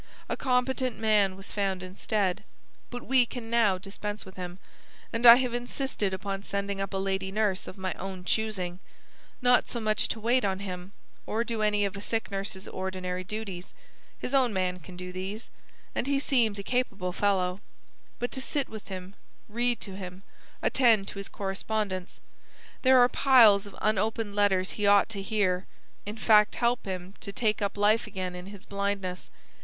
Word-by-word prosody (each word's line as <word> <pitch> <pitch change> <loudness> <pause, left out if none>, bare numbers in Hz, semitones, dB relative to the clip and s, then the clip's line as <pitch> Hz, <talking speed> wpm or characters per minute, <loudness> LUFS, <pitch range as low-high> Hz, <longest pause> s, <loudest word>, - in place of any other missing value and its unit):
A - - -1
competent 255 -1 0
man 210 -3 +3
was 195 +1 -8
found 195 -3 -1
instead. 190 0 -1 0.5
But 245 -1 -7
we 260 -1 +5
can 230 -2 -7
now 220 -5 +4
dispense 205 +2 -6
with 190 - -12
him, 180 -1 -6 0.6
and 235 +1 +4
I 235 - +13
have 250 -1 0
insisted 245 -3 -1
upon 195 +1 -3
sending 200 0 -3
up 195 - -3
a 195 - -2
lady 190 0 -1
nurse 205 -2 0
of - - -8
my 190 -1 -2
own 190 -1 -6
choosing; 185 -3 -1 0.6
not 245 0 +4
so 240 - -2
much 215 -1 +2
to 225 - -3
wait 240 +4 +2
on 190 -2 0
him, 185 -1 -7 0.3
or 225 +2 0
do 230 -2 -3
any 210 -1 +2
of 200 - -3
a 200 - -6
sick 225 +1 -2
nurse's 195 -1 -4
ordinary 185 -1 -4
duties 195 -3 -6 0.4
his 250 - -5
own 260 -3 +4
man 185 -2 -1
can 180 +2 -12
do 180 0 -6
these, 190 +5 -6 0.4
and - - -2
he 280 0 +2
seems 235 -7 +2
a 200 - -5
capable 200 -7 -1
fellow 190 -2 +1 0.6
but 245 - -3
to 265 - -3
sit 280 0 -1
with 220 -1 -9
him, 185 0 -7 0.3
read 240 +2 0
to 195 -3 -6
him, 185 0 -8 0.4
attend 225 -6 +4
to 200 - -7
his 200 - -5
correspondence, 195 -1 -3 0.6
there 260 0 +6
are 245 -1 +7
piles 230 -7 +6
of 200 - -12
unopened 215 0 0
letters 195 -2 +2
he 210 -1 -1
ought 200 +1 +6
to 205 -3 -4
hear, 195 -3 0 0.4
in 210 +2 -5
fact 215 -1 +5
help 240 +1 +1
him 185 -1 -5
to 200 - -6
take 215 -1 0
up 200 0 -1
life 210 +2 +3
again 185 -3 -4
in 180 +1 -8
his 200 -1 -11
blindness. 200 -2 -3
200 Hz, 180 wpm, -28 LUFS, 190-225 Hz, 0.6 s, I